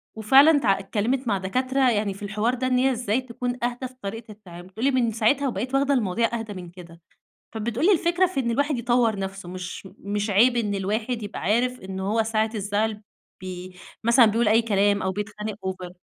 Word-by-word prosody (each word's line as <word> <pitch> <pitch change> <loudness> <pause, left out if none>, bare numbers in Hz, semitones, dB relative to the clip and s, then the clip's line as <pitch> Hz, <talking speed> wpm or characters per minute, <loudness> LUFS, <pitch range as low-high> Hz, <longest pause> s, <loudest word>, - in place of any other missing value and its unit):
وفعلًا 275 +8 +6
ت - - -5
اتكلّمِت 215 +6 0
مع 200 -3 +2
دكاترة 255 +7 +1
يعني 205 -2 0
في 200 - -11
الحوار 215 +4 0
ده 255 0 -1
إن 250 -1 +2
هي 265 +1 +3
إزاي 240 0 -1
تكون 245 0 -4
أهْدى 245 +1 -2
في 255 - -18
طريقة 220 +2 -6
التعامل، 180 -4 -12
بتقول 220 +7 -4
لي 280 - +4
من 240 -3 +1
ساعتها 235 +6 +1
وبقِت 250 +3 -3
واخدة 280 +1 +2
المواضيع 230 0 0
أهدَى 220 -2 -6
من 180 -2 -8
كده، 170 -1 -14 0.5
فبتقول 230 - -1
لي 410 - +6
الفكرة 350 +2 +2
في 300 -7 -2
إن 235 -2 -1
الواحد 285 +2 0
يطوّر 235 -3 +1
نَفسه، 195 -2 -5
مش 185 +1 -7
مش 205 +1 -3
عِيب 240 +5 +4
إن 210 -3 0
الواحد 220 +4 -2
يبقى 205 - -6
عارف 250 +5 0
إنه 190 0 -5
هو 225 0 +3
ساعة 220 0 0
الزعل 210 +1 -1 0.4
ب - - -8 0.6
مثلًا 235 0 +6
بيقول 220 +1 +2
أي 225 +2 +4
كلام 205 -2 +2
أو 190 0 -1
بيتخانق 210 +1 -5
over 185 -1 -5
220 Hz, 200 wpm, -24 LUFS, 200-250 Hz, 0.6 s, وفعلًا